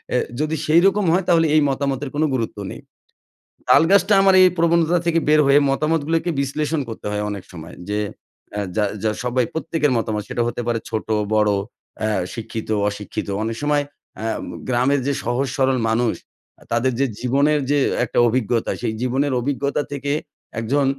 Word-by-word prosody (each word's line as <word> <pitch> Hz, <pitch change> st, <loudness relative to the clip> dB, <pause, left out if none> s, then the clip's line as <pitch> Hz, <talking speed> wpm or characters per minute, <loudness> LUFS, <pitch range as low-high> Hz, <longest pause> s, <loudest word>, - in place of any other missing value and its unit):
এ -, -, +4 dB, 0.2 s
যদি 155 Hz, +1 st, 0 dB
সেইরকম 190 Hz, +5 st, +4 dB
হয় 185 Hz, +1 st, +2 dB
তাহলে 165 Hz, -1 st, +4 dB
এই 155 Hz, -, +6 dB
মতামতের 135 Hz, 0 st, -2 dB
কোনো 155 Hz, +2 st, +2 dB
গুরুত্ব 115 Hz, -4 st, -2 dB
নেই। -, -, -9 dB, 0.9 s
তালগাছটা 195 Hz, +4 st, +5 dB
আমার 195 Hz, -1 st, +5 dB
এই 185 Hz, -, +8 dB
প্রবণতা 170 Hz, 0 st, +3 dB
থেকে 165 Hz, -1 st, +2 dB
বের 155 Hz, -, +5 dB
হয়ে 140 Hz, +1 st, +6 dB
মতামতগুলোকে 160 Hz, +3 st, 0 dB
বিশ্লেষণ 150 Hz, +2 st, -1 dB
করতে 110 Hz, -, -8 dB
হয় 105 Hz, 0 st, -2 dB
অনেক 100 Hz, -2 st, -5 dB
সময় 85 Hz, -1 st, -10 dB, 0.2 s
যে, 105 Hz, +1 st, 0 dB, 0.6 s
আ -, -, 0 dB, 0.2 s
যা 105 Hz, -1 st, +2 dB, 0.2 s
যা 110 Hz, -, +2 dB
সবাই 125 Hz, 0 st, +1 dB
প্রত্যেকের 160 Hz, -3 st, 0 dB
মতামত, 110 Hz, -2 st, -1 dB
সেটা 120 Hz, -, -1 dB
হতে 120 Hz, +1 st, -3 dB
পারে 115 Hz, -1 st, 0 dB
ছোটো, 110 Hz, 0 st, -2 dB, 0.2 s
বড়ো 105 Hz, -1 st, +3 dB, 0.4 s
অ্যা 110 Hz, 0 st, 0 dB, 0.2 s
শিক্ষিত, 110 Hz, -1 st, -6 dB, 0.2 s
অশিক্ষিত 105 Hz, 0 st, -6 dB, 0.2 s
অনেক 115 Hz, 0 st, -2 dB
সময় 145 Hz, 0 st, +2 dB, 0.4 s
আ -, -, -4 dB, 0.2 s
ম -, -, -7 dB, 0.2 s
গ্রামের 130 Hz, +3 st, +2 dB
যে 140 Hz, -, +1 dB
সহজ 125 Hz, +4 st, 0 dB
সরল 130 Hz, -1 st, +2 dB
মানুষ, 115 Hz, +1 st, +1 dB, 0.5 s
আ -, -, -15 dB
তাদের 120 Hz, +3 st, +2 dB
যে 140 Hz, -, +3 dB
জীবনের 140 Hz, +4 st, +2 dB
যে 145 Hz, -, +3 dB, 0.2 s
একটা 120 Hz, -, 0 dB
অভিজ্ঞতা, 115 Hz, -1 st, 0 dB
সেই 110 Hz, -, -1 dB
জীবনের 130 Hz, +2 st, 0 dB
অভিজ্ঞতা 140 Hz, +2 st, -1 dB
থেকে 140 Hz, 0 st, -3 dB, 0.5 s
একজন 135 Hz, +5 st, +1 dB
135 Hz, 170 wpm, -21 LUFS, 115-155 Hz, 0.9 s, এই